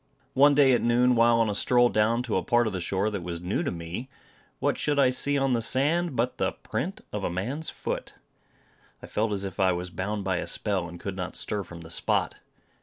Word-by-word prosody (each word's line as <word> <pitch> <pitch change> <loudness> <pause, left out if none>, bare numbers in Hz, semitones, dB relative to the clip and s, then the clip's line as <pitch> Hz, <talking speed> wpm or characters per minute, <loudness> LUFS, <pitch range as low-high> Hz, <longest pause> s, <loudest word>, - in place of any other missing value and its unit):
One 145 +2 +6
day 135 -2 +6
at - - +2
noon, 125 +1 +3
while 115 0 +4
on 115 - +3
a 105 - -1
stroll 120 +4 +4
down 110 +3 +2
to 120 - -2
a - - +2
part 120 0 +2
of 110 - -2
the 95 - -2
shore 95 +4 0
that 100 -3 -3
was 85 -1 -5
new 90 +4 -1
to - - -1
me, 85 +9 -6 0.5
what - - 0
should 150 -1 0
I 135 -3 +5
see 140 +2 +1
on 135 -1 +1
the 115 - +1
sand 145 +6 +1
but 125 +2 -1
the - - 0
print - - -4
of - - -3
a - - 0
man's 120 - -3
foot! - - -5 0.9
I - - -5
felt 110 +1 -1
as 100 -1 -2
if 95 - -7
I 95 -1 +4
was 90 +1 -5
bound 100 +3 -3
by 95 -2 0
a - - -3
spell, 95 -5 -1
and 85 0 -10
could 100 -2 -5
not 90 -1 -5
stir 105 - -3
from, 85 -2 -10
the 80 0 -11
spot. - - 0
110 Hz, 240 wpm, -27 LUFS, 95-125 Hz, 0.9 s, One